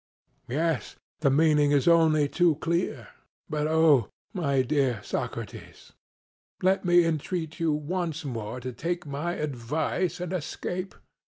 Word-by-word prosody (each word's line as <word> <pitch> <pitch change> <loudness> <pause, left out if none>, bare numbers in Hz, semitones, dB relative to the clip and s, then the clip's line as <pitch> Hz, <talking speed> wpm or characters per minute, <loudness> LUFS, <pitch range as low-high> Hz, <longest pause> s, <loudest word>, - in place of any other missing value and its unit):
CRITO: 130 +5 -2
Yes; 165 -2 -1 0.2
the 145 - +3
meaning 150 +1 +4
is 145 0 +2
only 160 -3 +5
too 170 +1 +3
clear. 165 - -2 0.4
But, 150 0 -1
oh! 155 -7 +4 0.2
my 140 -7 +1
beloved 130 -5 0
Socrates, - - -6 0.7
let 190 +1 +3
me 175 -1 +5
entreat 160 0 -2
you 165 -1 +2
once 160 +1 -2
more 115 -2 -4
to 130 +1 -5
take 170 +6 -3
my 145 +5 -3
advice 150 +5 -2
and 180 +1 -4
escape. 180 +2 -4
155 Hz, 130 wpm, -27 LUFS, 140-170 Hz, 0.7 s, only